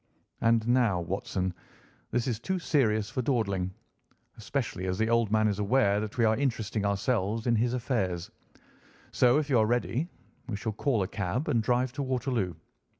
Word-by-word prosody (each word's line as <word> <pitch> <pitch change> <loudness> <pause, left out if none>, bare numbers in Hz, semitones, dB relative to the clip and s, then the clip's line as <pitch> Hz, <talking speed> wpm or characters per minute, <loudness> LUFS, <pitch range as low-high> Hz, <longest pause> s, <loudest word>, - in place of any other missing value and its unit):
And 115 0 +3
now, 120 -7 +3
Watson, 95 +1 -2 0.6
this 120 0 0
is 120 -4 -1
too 190 +10 -2
serious 110 - +1
for 130 - -1
dawdling, 100 -8 0 0.6
especially 95 +1 -3
as 90 0 -1
the 110 +2 +1
old 115 -3 +2
man 110 0 +3
is 105 -1 -1
aware 105 -1 +3
that 105 +2 -5
we 115 - +4
are 110 0 +4
interesting 110 -5 -1
ourselves 105 +1 0
in 120 -2 +3
his 120 +3 +1
affairs; 95 -9 -2 0.8
so 125 +2 +4
if 150 -1 0
you 130 -5 +3
are 110 - +4
ready, 120 +6 0 0.4
we 110 - -2
shall 110 +2 -3
call 115 -2 +1
a - - -3
cab 100 - -2
and 115 - +2
drive 125 +2 +1
to 145 - -3
Waterloo. 125 - -1
115 Hz, 175 wpm, -29 LUFS, 100-125 Hz, 0.8 s, we